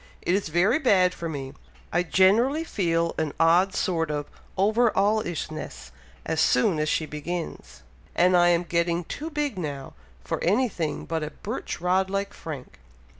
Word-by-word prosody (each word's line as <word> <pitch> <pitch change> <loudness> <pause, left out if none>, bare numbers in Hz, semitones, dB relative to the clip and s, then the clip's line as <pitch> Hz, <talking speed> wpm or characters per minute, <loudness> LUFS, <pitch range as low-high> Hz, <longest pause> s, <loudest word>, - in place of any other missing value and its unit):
It 175 - +1
is 195 -2 0
very 180 - +2
bad 190 - +4
for 170 - -5
me! 135 -3 -6 0.4
I 175 - +3
generally 215 - +3
feel 170 - 0
an 155 -2 -1
odd 175 +4 +4
sort 165 -4 0
of 145 -1 -2 0.3
over 220 +5 +3
all 210 +3 +3
ish 170 -4 -4
ness 155 - -8 0.3
as - - 0
soon 155 +6 +3
as 155 0 0
she 155 - 0
begins; 155 - -6 0.3
and 180 +1 +4
I 175 0 +5
am 175 0 +3
getting 170 0 0
too 305 - -6
big 290 - -2
now, 140 -5 -5 0.3
for - - -3
any 220 +9 +3
thing 160 -6 -3
but 165 -1 -2
a 150 - -3
birch 215 +9 -6
rod 185 +2 +1
like 195 +1 -2
Frank. 140 - -8
175 Hz, 175 wpm, -25 LUFS, 160-200 Hz, 0.4 s, I